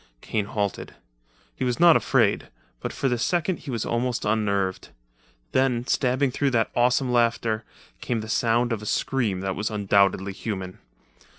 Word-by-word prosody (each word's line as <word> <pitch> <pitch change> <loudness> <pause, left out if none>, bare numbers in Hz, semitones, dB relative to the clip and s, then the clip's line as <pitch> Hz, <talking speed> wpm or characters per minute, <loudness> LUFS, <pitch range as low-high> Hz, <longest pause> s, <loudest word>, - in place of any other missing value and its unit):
Kane 105 -2 -2
halted. 100 -2 -3 0.6
He - - -4
was 125 +1 -1
not 170 -1 +7
afraid, - - +2 0.3
but - - -4
for 135 - -1
the 125 -2 0
second 175 +5 0
he 145 - -10
was 115 -4 -2
almost 120 +1 -1
unnerved. 100 -3 0 0.6
Then, 125 -2 +1
stabbing 130 +1 +1
through 140 +2 0
that 115 -4 +1
awesome 125 +1 +2
laughter, 115 -2 +1 0.4
came 115 - -2
the 110 - -7
sound 120 +1 +1
of 110 - -4
a 105 - -7
scream 110 -9 0
that 95 -1 -2
was 105 +1 -2
undoubtedly 100 -2 +2
human. 95 -3 -5
115 Hz, 160 wpm, -25 LUFS, 105-125 Hz, 0.6 s, not